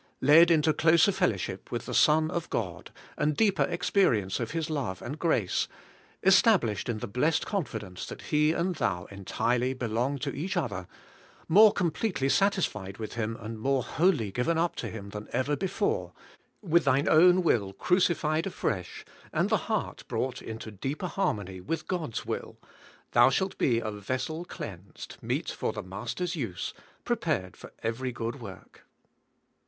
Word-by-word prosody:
Led 155 +5 +7
into 155 -2 +4
closer 165 +5 +5
fellowship 105 - -2
with 120 -2 -3
the - - -5
Son 155 +1 +4
of 170 - -3
God, 95 -7 -3 0.3
and 150 0 +1
deeper 205 -3 +3
experience 110 - +1
of 115 -2 -2
His 160 +1 -2
love 130 - -3
and 145 +6 -6
grace, 125 - +1 0.3
— - - -30
estab 195 +2 +6
lished 110 0 -3
in 115 - -1
the - - -5
blessed 125 +10 +1
confidence 110 - -4
that - - -8
He 150 0 +2
and 170 +3 0
thou 90 - -1
en 100 -1 -10
tirely 125 +5 0
belong 125 +3 -1
to 140 +1 -3
each 180 +6 -3
other, 100 - -2 0.3
— - - -26 0.3
more 210 +5 +8
completely 175 -5 -1
satisfied 120 - +1
with 110 -2 -6
Him 115 -1 -2
and 110 0 -7
more 135 +2 +1
wholly 155 - +1
given 125 +10 0
up 170 +1 +1
to - - -3
Him 100 -3 -8
than 105 +1 -7
ever 130 +4 +1
before, 305 - -1 0.3
— - - -27
^with 170 +1 +4
thine 135 +3 +2
own 180 +3 +6
will 105 - +2
crucified 165 - +1
afresh, 95 - -3 0.3
and - - 0
the - - +5
heart - - -2
brought 130 -1 -2
into 110 -1 -7
deeper 135 - -4
harmony 105 - -2
with 165 - -4
God's 160 -11 -3
will, - - -5 0.3
— - - -26
thou - - +6
shalt 190 +8 0
be 120 -3 +3
a 110 -2 -2
vessel 130 - -4
cleansed, 95 - -9
meet - - -2
for - - -2
the - - -6
Master's 105 - -4
use, 115 - -4 0.3
prepared 95 -1 -1
for - - -12
every 120 +3 -2
good 120 +2 -5
work. 100 -5 -12
135 Hz, 170 wpm, -28 LUFS, 110-170 Hz, 0.3 s, more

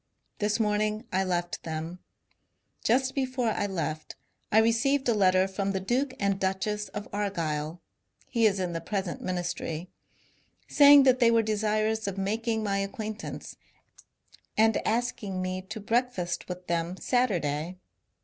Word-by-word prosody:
This 210 +2 +1
morning 215 +1 0
I 190 +1 +2
left 175 -2 -2
them. 160 +2 -5 0.8
Just 260 +3 +2
before 255 -3 0
I 205 - -1
left 155 -5 -4 0.4
I 215 - +4
received 230 +5 +3
a 235 - +4
letter 185 -2 +4
from 195 0 -2
the 190 - 0
Duke 255 +7 -1
and 200 -1 +1
Duchess 195 +2 -1
of 205 +2 -6
Argyll 165 -5 -2 0.4
(he 230 -3 +3
is 200 -2 0
in 180 -2 -2
the 165 - -3
present 190 0 -3
ministry), 175 -2 -3 0.8
saying 285 -1 +8
that 255 -1 +4
they 235 -2 +6
were 230 -1 +4
desirous 215 0 0
of 200 -1 -3
making 220 +3 -1
my 200 -1 0
acquaintance 215 +2 -5 1.0
and 220 0 +5
asking 220 -4 -1
me 185 0 -2
to 220 0 -5
breakfast 225 -6 -1
with 180 0 -6
them 170 +1 -1
Saturday. 180 - 0
205 Hz, 140 wpm, -28 LUFS, 185-225 Hz, 1.0 s, saying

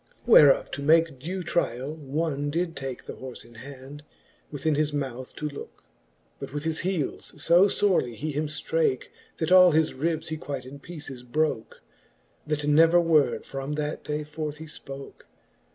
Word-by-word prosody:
Whereof 150 - +6
to 140 - -5
make 160 -1 +3
due 180 +6 -4
tryall, 145 -5 -1
one 145 0 -2
did 165 +2 -2
take 135 -2 -6
The - - -7
horfe 130 -3 -9
in 120 - -17
hand, 135 +4 -10 0.5
within 155 +2 -1
his 150 +1 +1
mouth 130 -3 -5
to 150 - -3
lookej 145 -1 -7 0.7
But - - -7
with 145 +1 -4
his 160 0 0
heeles 170 -4 -3
fo 175 +6 +5
fbrely 185 - +1
he 155 +7 -4
him 150 +2 -1
ftrake, 480 - -1 0.3
That 160 +1 -2
all 180 -2 +8
his 160 0 +2
ribs 160 +3 -2
he 155 - -3
quite 140 -3 -6
in 140 +2 -10
peeces 145 -5 -8
broke, 125 -1 -2 0.6
That 150 -1 -1
never 165 +4 +5
word 160 -4 +2
from 135 +2 -5
that 150 0 -3
day 150 0 -3
forth 150 0 -5
he 160 - -9
ipoke. 140 -3 -9
150 Hz, 170 wpm, -26 LUFS, 135-165 Hz, 0.7 s, all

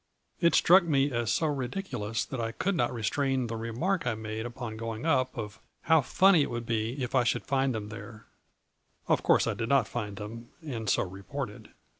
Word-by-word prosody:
It 170 -1 +4
struck 185 +2 +7
me 145 -4 +2
as 120 -2 0
so 160 - +1
ridiculous 125 - -2
that 130 - -4
I 115 0 -3
could 195 - 0
not 150 -9 +1
restrain 130 +3 0
the 115 0 -4
remark 120 +12 -1
I 110 - +1
made 110 +1 -4
upon 120 -2 -6
going 115 +3 -5
up 130 -6 +1
of 110 -1 -6
' - - -47
how 160 -2 +5
funny 185 +5 +5
it - - 0
would 120 0 -4
be 115 +4 -1
if 125 - -4
I 130 -2 +4
should 120 - 0
find 135 -3 +1
them 105 -1 -5
there/ 110 0 -10 0.8
Of - - +3
course, - - +4
I - - 0
did 115 - -3
not 135 -5 +4
find 105 -4 -4
them 115 +3 -8 0.2
and 115 -7 -3
so - - +3
reported. 105 +5 -7
120 Hz, 205 wpm, -29 LUFS, 110-140 Hz, 0.8 s, struck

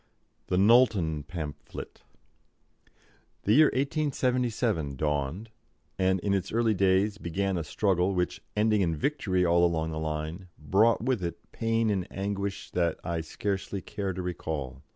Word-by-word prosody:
THE 90 - +1
KNOWLTON 100 - +4
PAMPHLET. 75 -5 -7 1.4
The 105 - +3
year 155 +5 +7
1877 125 - 0
dawned, 75 - -2 0.5
and 95 0 +2
in 100 +1 0
its 95 -2 -1
early 115 0 +2
days 100 +2 +2
began 95 +3 -1
a 85 - -1
struggle 95 +3 +1
which, 90 -1 -1 0.2
ending 105 -1 +3
in 85 -3 +1
victory 95 - 0
all 85 0 +4
along 80 -2 +1
the 80 - -3
line, 80 +4 -4
brought 105 +9 +3
with 125 -6 0
it 85 -1 -6
pain 115 -1 +1
and 95 -2 -1
anguish 100 0 -4
that 85 -2 0
I 85 -2 -2
scarcely 100 +4 -3
care 100 -2 -3
to 90 0 -4
recall. 75 -7 -4
95 Hz, 140 wpm, -28 LUFS, 85-110 Hz, 1.4 s, year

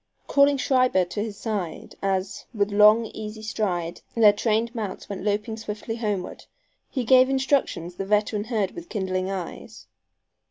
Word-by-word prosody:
Calling 280 0 +4
Schreiber 255 -8 +3
to 180 +4 -4
his 215 -2 -6
side, 200 -8 -4
as, 195 0 -2
with 205 -1 +1
long 210 +3 +6
easy 215 0 -7
stride 180 -6 -2
their 215 -3 +7
trained 225 +2 0
mounts 215 -5 -5
went 200 - -5
loping 210 +2 -1
swiftly 220 +1 -5
homeward, 205 -5 -3 0.4
he 260 - -2
gave 255 +2 +6
instructions 265 - 0
the 195 +2 -5
veteran 210 0 +1
heard 215 -5 -1
with 340 0 -10
kindling 190 -2 -2
eyes. 190 -3 -7
210 Hz, 150 wpm, -25 LUFS, 195-230 Hz, 0.4 s, their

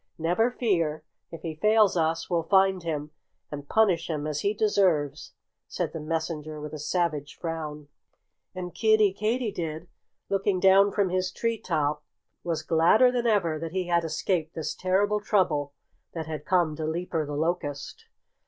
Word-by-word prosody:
"Never 175 +9 +2
fear! 170 -11 0 0.3
If 165 -1 -10
he 165 -2 -3
fails 210 +4 +3
us 165 -1 0
we'll 170 -2 +1
find 190 +1 +3
him 150 -3 -4 0.4
and 145 -1 -7
punish 185 -7 +2
him 150 -2 -2
as 150 -1 -2
he 200 - +1
deserves," 180 -9 +1 0.3
said - - -3
the 165 - -4
messenger 155 -1 -4
with 150 0 -7
a 155 - -6
savage 150 -2 -2
frown. 155 -3 -5 0.7
And 180 -1 -6
Kiddie 215 -3 +3
Katydid, 200 -8 -2 0.4
looking 195 -1 0
down 195 +2 +5
from 200 -2 +1
his 185 0 -1
tree 230 -1 -2
top, 150 -3 -1 0.4
was 165 -3 -2
gladder 170 +11 +4
than 240 -1 0
ever 175 -8 +1
that 165 +1 -6
he 185 -2 -2
had 170 -1 +2
escaped 160 +1 -2
this 160 - -3
terrible 200 +3 +1
trouble 175 -9 +1 0.4
that 160 -2 -4
had 155 -1 -6
come 175 -5 +2
to 160 - -3
Leaper 165 0 -2
the 145 - -4
Locust. 160 - -3
170 Hz, 160 wpm, -27 LUFS, 155-195 Hz, 0.7 s, down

